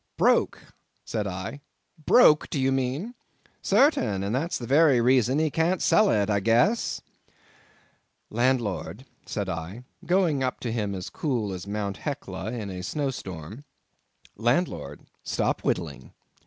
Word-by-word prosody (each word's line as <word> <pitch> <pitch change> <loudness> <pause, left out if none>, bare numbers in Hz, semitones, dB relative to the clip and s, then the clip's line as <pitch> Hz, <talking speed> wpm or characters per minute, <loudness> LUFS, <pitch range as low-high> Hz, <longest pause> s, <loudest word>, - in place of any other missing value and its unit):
"Broke," - - +3 0.5
said 105 -2 -2
I—"broke, 145 - +1
do 145 - -2
you 135 0 +2
mean?" 135 - -2 0.5
"Sartain, 195 - +2
and 100 +2 -2
that's 155 +7 -1
the 120 - -6
very 140 0 +5
reason 125 +1 +3
he 155 -1 +1
can't 170 +5 +1
sell 215 -1 +4
it, 100 -2 +2
I 105 -1 +1
guess." 120 - +2 1.3
"Landlord," 120 -1 -1 0.2
said 100 -2 -3
I, 95 +6 -5 0.2
going 175 -6 +2
up 130 - -2
to 120 - -3
him 105 -4 -2
as 90 -1 -6
cool 120 -10 -2
as 90 +1 -7
Mt. 100 -2 -3
Hecla 110 -9 -5
in 110 -5 -5
a 90 -1 -6
snow 140 +8 -2
storm—"landlord, 100 - -5 0.2
stop - - -1
whittling. - - -3
120 Hz, 130 wpm, -26 LUFS, 100-145 Hz, 1.3 s, very